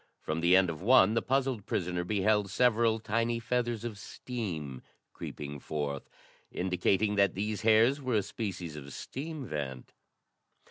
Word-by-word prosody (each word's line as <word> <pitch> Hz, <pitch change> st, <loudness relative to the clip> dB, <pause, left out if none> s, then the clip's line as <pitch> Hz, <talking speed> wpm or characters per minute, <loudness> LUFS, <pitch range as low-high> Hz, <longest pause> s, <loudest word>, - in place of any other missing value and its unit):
From 80 Hz, +1 st, -3 dB
the 85 Hz, +2 st, +5 dB
end 95 Hz, -2 st, +3 dB
of 80 Hz, -, -8 dB
one, 110 Hz, -1 st, +6 dB
the 115 Hz, -, +2 dB
puzzled 130 Hz, -5 st, 0 dB
prisoner 90 Hz, -1 st, -1 dB
beheld 105 Hz, +1 st, +1 dB
several 115 Hz, +1 st, +3 dB
tiny 115 Hz, +2 st, 0 dB
feathers 120 Hz, -1 st, -1 dB
of 110 Hz, -4 st, -5 dB
steam 85 Hz, -, -5 dB, 0.3 s
creeping 70 Hz, -1 st, -7 dB
forth, 70 Hz, -1 st, -4 dB, 0.4 s
indicating 95 Hz, +3 st, +1 dB
that 100 Hz, -1 st, +3 dB
these 105 Hz, +1 st, -2 dB
hairs 115 Hz, +6 st, +4 dB
were 130 Hz, -3 st, -1 dB
a 105 Hz, -, +2 dB
species 90 Hz, -7 st, -5 dB
of 70 Hz, -2 st, -9 dB
steam 150 Hz, +1 st, -6 dB
vent. 70 Hz, -, -5 dB
105 Hz, 145 wpm, -30 LUFS, 85-115 Hz, 0.4 s, one